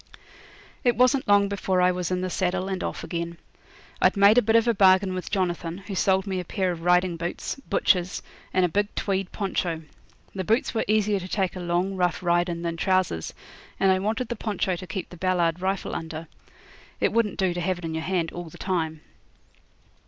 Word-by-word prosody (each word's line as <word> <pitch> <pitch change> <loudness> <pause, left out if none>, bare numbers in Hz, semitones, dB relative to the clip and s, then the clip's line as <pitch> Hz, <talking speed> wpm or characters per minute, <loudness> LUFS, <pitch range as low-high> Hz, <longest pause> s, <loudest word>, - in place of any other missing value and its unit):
It 245 -1 +3
wasn't 255 +2 +3
long 205 -1 +5
before 190 -2 0
I 180 0 +4
was 180 -1 -2
in 180 0 -1
the 185 - -2
saddle 185 +1 -1
and 190 -1 -3
off - - -4
again. 170 0 -4 0.6
I'd - - +4
made 200 +4 +7
a - - +2
bit 225 0 +2
of 230 +1 +4
a 235 - +4
bargain 190 -1 +5
with 185 -1 -4
Jonathan, 175 -3 -1
who 195 +1 -8
sold 190 0 +2
me 190 -2 -2
a - - -3
pair 185 +1 -1
of 170 -2 -6
riding 180 0 +3
boots, 170 +1 -3 0.2
butcher's, 180 -1 +1 0.3
and 185 -1 +3
a - - +3
big 205 +5 -1
tweed 195 -2 -1
poncho. 175 -5 -2 0.5
The 190 - -3
boots 225 +7 +1
were 225 - 0
easier 210 -1 +2
to 185 - -7
take 190 -2 -1
a - - -5
long 175 +2 -1
rough 180 -1 0
ride 175 0 +2
in 170 0 -4
than 170 -1 -2
trousers, 185 - 0 0.4
and 195 - +4
I 185 - +3
wanted 220 +5 -2
the 240 - -2
poncho 205 -4 -1
to 180 +2 -8
keep 175 +2 -5
the 175 - -10
Ballard 175 -1 +1
rifle 190 +1 -1
under. 160 0 -5 0.7
It - - +1
wouldn't 225 -4 +1
do 190 -2 +1
to 175 - -3
have 185 +1 0
it 175 - -7
in 160 - -3
your 160 - -2
hand 175 -3 -1
all 175 -1 -7
the - - -13
time. 160 -5 -2
185 Hz, 210 wpm, -25 LUFS, 175-195 Hz, 0.7 s, made